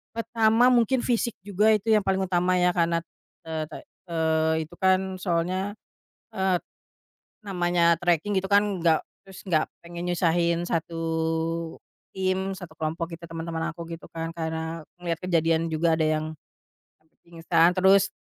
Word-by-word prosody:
Pertama 230 +1 +3
mungkin 240 +1 +2
fisik 235 -2 0
juga 205 +2 +2
itu 215 +1 +2
yang 215 - +4
paling 190 -1 0
utama 180 0 +1
ya 180 0 +3
karena, 170 -1 +2 0.5
eee, 160 -1 -3
te - - -8 0.3
eee, 160 -1 +1
itu 160 - -16
kan 190 0 +2
soalnya, 185 +3 -1 0.5
eee, 190 -1 +1 0.9
namanya 175 -3 +2
treking 175 +3 +1
gitu 190 0 -3
kan 200 -2 +2
gak 165 -2 +3 0.2
terus 190 -1 -12
gak 155 -4 +1 0.2
pengen 170 +1 -6
nyusahin 170 0 +1
satu 165 -1 -2 1.2
tim, 190 0 0
satu 180 -4 -10
kelompok 165 +2 -3
gitu, 170 - -14
teman-teman 165 0 -3
aku 170 +1 -8
gitu 165 - -8
kan 165 0 -4
karena 160 0 -4 0.2
ngeliat 170 -2 -3
kejadian 165 -2 +1
juga 160 +1 +1
ada 160 - +1
yang 155 0 0 0.7
sampai 160 0 -38
pingsan 165 0 +2
terus 195 +1 +4
175 Hz, 145 wpm, -26 LUFS, 165-190 Hz, 1.2 s, yang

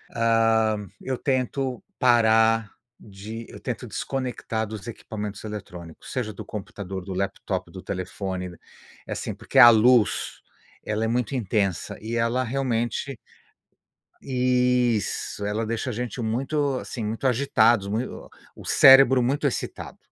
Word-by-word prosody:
hã, 115 -2 +2
eu 130 -1 -3
tento 130 -1 -1 0.2
parar 115 -2 +4 0.3
de 110 +3 -9
eu - - -11
tento - - -5
desconectar 125 -4 -3
dos 110 +1 -8
equipamentos 105 -2 -6
eletrônicos, 90 -6 -9
seja 115 -5 -3
do - - -8
computador, 95 -3 -6
do 95 - -5
laptop, 100 +1 -3
do - - -9
telefone. 95 -1 -5 0.5
Assim, - - -4
porque 135 - 0
a 120 - +11
luz, 120 0 +3 0.4
ela 110 +1 -2
é - - +1
muito 120 +2 -1
intensa 100 -5 -1
e 115 +2 -4
ela 115 +2 +1
realmente 125 0 -2 1.0
Isso, 125 -5 0
ela 105 +2 -1
deixa 115 +3 -2
a - - -3
gente 120 +2 -4
muito, 135 +4 -1
assim, 115 -4 -6
muito 110 +5 -2
agitados, 120 -5 +3
mui 110 +5 -1
o - - -10 0.3
o - - -12
cérebro 135 -1 +7
muito 140 +4 0
excitado 130 - -4
115 Hz, 130 wpm, -25 LUFS, 105-125 Hz, 1.0 s, a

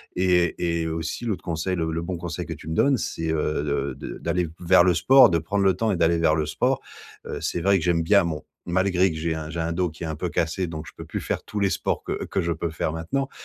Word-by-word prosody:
Et 90 -2 +2 0.3
et 80 - -2
aussi, 80 +7 -3
l'autre 100 -6 -2
conseil, 85 +3 -2
le 80 -2 -1
le 80 +1 -2
bon 90 +2 -3
conseil - - -5
que - - -5
tu 80 - -10
me 80 - -2
donnes, 135 +6 +4
c'est, 80 -4 -3
heu, 75 -1 0
de 70 -2 -1 0.2
de - - -8
d'aller 85 +1 0
vers 90 0 +6
le 90 - +4
sport, 135 +7 +7
de 85 - +2
prendre 100 +5 -1
le 95 - +5
temps 110 +2 0
et 95 - 0
d'aller 85 0 +3
vers 80 -1 +3
le 80 -1 0
sport. 75 - 0 0.5
Heu, - - -5
c'est - - -1
vrai 100 +2 +4
que 85 - -3
j'aime 85 -1 +2
bien 100 +4 +5
mon 80 -3 -2 0.3
malgré 95 +1 +2
que - - -6
j'ai 80 +1 -1
un 80 -1 -5
j'ai 85 +1 -3
un 80 +1 -1
dos 90 +1 0
qui 80 +2 -10
est - - -2
un 80 -1 -4
peu 90 - -2
cassé, 85 +3 -1
donc 80 -2 -6
je - - -9
peux - - -9
plus - - -4
faire - - -2
tous 105 - -4
les 100 - +3
sports - - -1
que - - -3
que - - -1
je 85 - -1
peux 85 +1 -2
faire 80 0 -2
maintenant. 110 - -2
85 Hz, 280 wpm, -24 LUFS, 80-95 Hz, 0.5 s, sport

